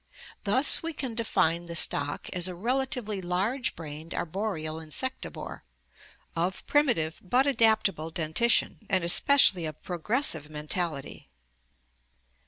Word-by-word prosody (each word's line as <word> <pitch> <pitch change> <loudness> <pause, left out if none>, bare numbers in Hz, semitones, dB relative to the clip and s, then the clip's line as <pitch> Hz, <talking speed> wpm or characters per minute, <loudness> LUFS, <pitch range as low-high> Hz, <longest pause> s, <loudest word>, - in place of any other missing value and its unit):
Thus 255 +8 +3
we 330 0 -4
can 260 -5 -4
define 175 -7 0
the 170 - -6
stock 145 -2 0
as 180 0 0
a 180 - -6
relatively 245 -1 -2
large 195 +9 -1
brained 160 0 -8
arboreal 160 -3 -3
insectivore, 160 - -4 0.7
of 175 +3 -2
primi 290 -5 +3
tive 160 0 -4
but 250 +8 +2
adaptable 220 - +2
dentition, 165 +9 +1
and 185 -3 +2
especially 180 - +5
of 155 -1 -8
progressive 175 - +1
mental 155 +2 -2
ity. 140 - -10
180 Hz, 120 wpm, -28 LUFS, 160-235 Hz, 0.7 s, especially